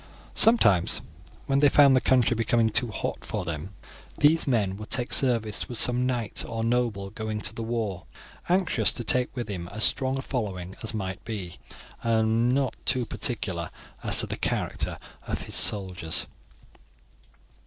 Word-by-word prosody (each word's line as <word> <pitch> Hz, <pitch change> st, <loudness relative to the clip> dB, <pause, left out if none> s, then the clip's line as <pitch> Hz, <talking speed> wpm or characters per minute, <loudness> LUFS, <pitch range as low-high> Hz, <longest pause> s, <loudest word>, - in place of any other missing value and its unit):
Sometimes, 105 Hz, -, +4 dB, 0.4 s
when 135 Hz, 0 st, +1 dB
they 145 Hz, 0 st, +5 dB
found 140 Hz, -1 st, +6 dB
the 130 Hz, -, +3 dB
country 125 Hz, -2 st, +3 dB
becoming 115 Hz, 0 st, +1 dB
too 125 Hz, -, +2 dB
hot 105 Hz, -, -4 dB
for -, -, -4 dB
them, 85 Hz, +4 st, -5 dB, 0.4 s
these 155 Hz, +2 st, +3 dB
men 105 Hz, -7 st, +1 dB
would 105 Hz, 0 st, -9 dB
take 125 Hz, -1 st, 0 dB
service 115 Hz, -5 st, +1 dB
with 120 Hz, -, -2 dB
some 125 Hz, +2 st, +5 dB
knight 120 Hz, -4 st, -2 dB
or 115 Hz, 0 st, -4 dB
noble 115 Hz, -5 st, -1 dB
going 110 Hz, 0 st, -4 dB
to -, -, -2 dB
the -, -, -6 dB
war, 110 Hz, -6 st, -3 dB, 0.4 s
anxious 180 Hz, -2 st, +3 dB
to 120 Hz, -, -3 dB
take 125 Hz, +4 st, 0 dB
with 120 Hz, -2 st, -4 dB
him 90 Hz, -5 st, -5 dB
as 110 Hz, +4 st, -4 dB
strong 130 Hz, 0 st, 0 dB
a 135 Hz, -, -4 dB
following 95 Hz, -8 st, -4 dB
as 110 Hz, 0 st, -4 dB
might 95 Hz, 0 st, -5 dB
be, 100 Hz, -7 st, -6 dB, 0.4 s
and 115 Hz, +1 st, +2 dB
not 130 Hz, -2 st, 0 dB
too 125 Hz, -2 st, +1 dB
particular 95 Hz, -9 st, -3 dB, 0.3 s
as -, -, +3 dB
to -, -, -3 dB
the -, -, -5 dB
character -, -, -2 dB, 0.3 s
of -, -, -3 dB
his -, -, -8 dB
soldiers. 90 Hz, -5 st, +1 dB
115 Hz, 165 wpm, -26 LUFS, 100-125 Hz, 0.4 s, found